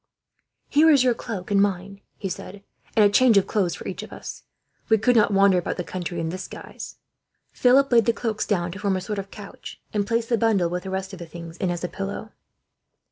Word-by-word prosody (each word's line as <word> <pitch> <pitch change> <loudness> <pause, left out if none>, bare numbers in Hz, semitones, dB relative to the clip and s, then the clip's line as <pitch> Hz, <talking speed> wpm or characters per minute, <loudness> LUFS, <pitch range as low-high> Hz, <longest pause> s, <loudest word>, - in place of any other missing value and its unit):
"Here 310 +3 +5
is 280 -5 +6
your 250 -2 +3
cloak 210 -5 -6
and 200 -1 +4
mine," 195 0 -1 0.2
he 195 - -4
said, 195 +1 -7 0.3
"and 215 -2 +6
a - - +6
change 240 -1 +6
of 195 - +4
clothes 190 -6 0
for - - -8
each - - -5
of - - -10
us. - - -8 0.5
We 220 - +5
could 245 +3 +2
not 215 -2 +5
wander 195 -2 +5
about 175 - -4
the 180 - -2
country, 175 -1 -5
in 165 -1 -2
this 185 +2 -5
guise." - - -9 0.6
Philip 270 +2 +4
laid 230 -3 +5
the - - +4
cloaks 225 -2 -3
down 175 -4 0
to 190 - -8
form 195 -1 0
a - - -4
sort 205 +2 -4
of 195 0 -6
couch; 200 -1 -10
and 205 -1 0
placed 230 0 0
the 235 -2 +2
bundle, 200 -7 +2
with 180 0 -2
the - - -4
rest 190 +1 -4
of 190 - -8
the 170 - -8
things 165 0 -9
in, 185 - -1
as 175 0 -3
a - - 0
pillow. 200 +3 -6
200 Hz, 240 wpm, -24 LUFS, 185-225 Hz, 0.6 s, is